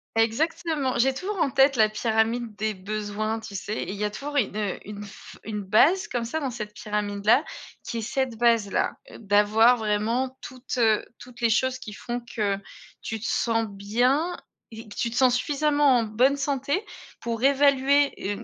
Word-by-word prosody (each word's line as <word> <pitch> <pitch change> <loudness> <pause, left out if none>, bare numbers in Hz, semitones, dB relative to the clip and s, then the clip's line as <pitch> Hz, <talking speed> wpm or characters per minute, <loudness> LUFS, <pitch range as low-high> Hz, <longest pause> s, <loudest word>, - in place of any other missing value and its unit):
Exactement, 270 +4 0
j'ai 265 +3 +3
toujours 390 +9 -4
en 280 - +2
tête 270 +2 +4
la 220 -2 +5
pyramide 220 +1 0
des 215 +1 -1
besoins, 215 +2 -3
tu 220 -2 -9
sais? 205 +2 -4
Et - - -4
il - - -5
y 210 - -4
a 210 - +1
toujours 285 +7 -7
une, 215 -5 0
heu, 205 -3 -2
une 210 0 -8
f 200 - -13
une 210 -1 -4
base 285 - +4
comme 240 -2 -2
ça 275 +8 -3
dans 280 -4 -2
cette 215 -3 -6
pyramide-là 210 +4 +1 0.4
qui 230 - -4
est - - -3
cette 245 +2 -2
base-là. 230 -3 +2 0.3
D'avoir 215 +3 +4
vraiment 230 +4 -1
toutes, 255 0 -7
heu, 220 -2 +3
toutes 250 0 -13
les 230 -1 +3
choses 260 +3 +1
qui 215 -4 -9
font 240 +4 -4 0.2
que 205 -3 0 0.5
tu 225 - -4
te 220 - -7
sens 225 -1 0
bien 245 - 0 0.4
et 225 0 -10
que - - -11
tu 235 - -1
te - - -6
sens 250 0 +4
suffisamment 290 -1 +2
en - - 0
bonne 245 +6 +2
santé 280 +5 -1 0.4
pour 230 0 -3
évaluer, 280 0 +4
heu, 205 +1 -2
230 Hz, 185 wpm, -25 LUFS, 215-265 Hz, 0.5 s, la